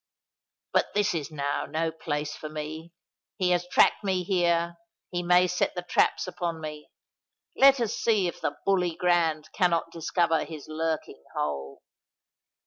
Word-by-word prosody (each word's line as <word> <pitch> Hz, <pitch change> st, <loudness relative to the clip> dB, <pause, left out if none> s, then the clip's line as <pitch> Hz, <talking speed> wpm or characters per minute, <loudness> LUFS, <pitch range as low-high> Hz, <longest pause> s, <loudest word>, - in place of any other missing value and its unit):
But -, -, +1 dB
this 210 Hz, -1 st, +2 dB
is 155 Hz, -3 st, -3 dB
now 145 Hz, -2 st, -2 dB
no 165 Hz, 0 st, -1 dB
place 150 Hz, -2 st, -3 dB
for 155 Hz, -, -7 dB
me: 155 Hz, +2 st, -6 dB, 0.5 s
he 180 Hz, -1 st, +2 dB
has 175 Hz, 0 st, +1 dB
tracked 180 Hz, -, +4 dB
me 190 Hz, -2 st, 0 dB
here—he 170 Hz, -1 st, -1 dB
may 180 Hz, +1 st, +5 dB
set 180 Hz, +1 st, 0 dB
the 180 Hz, -, -3 dB
traps -, -, +2 dB
upon 175 Hz, -2 st, -3 dB
me. 150 Hz, -1 st, -7 dB, 0.7 s
Let 275 Hz, 0 st, +7 dB
us 230 Hz, -2 st, 0 dB
see 215 Hz, -5 st, +2 dB
if 175 Hz, -, -6 dB
the 145 Hz, -, -2 dB
Bully 180 Hz, -4 st, +2 dB
Grand 165 Hz, -4 st, +1 dB
cannot 170 Hz, -2 st, +1 dB
discover 165 Hz, 0 st, +1 dB
his 155 Hz, -2 st, -8 dB
lurking 160 Hz, 0 st, -3 dB
hole." 70 Hz, -2 st, -3 dB
170 Hz, 145 wpm, -27 LUFS, 155-180 Hz, 0.7 s, Let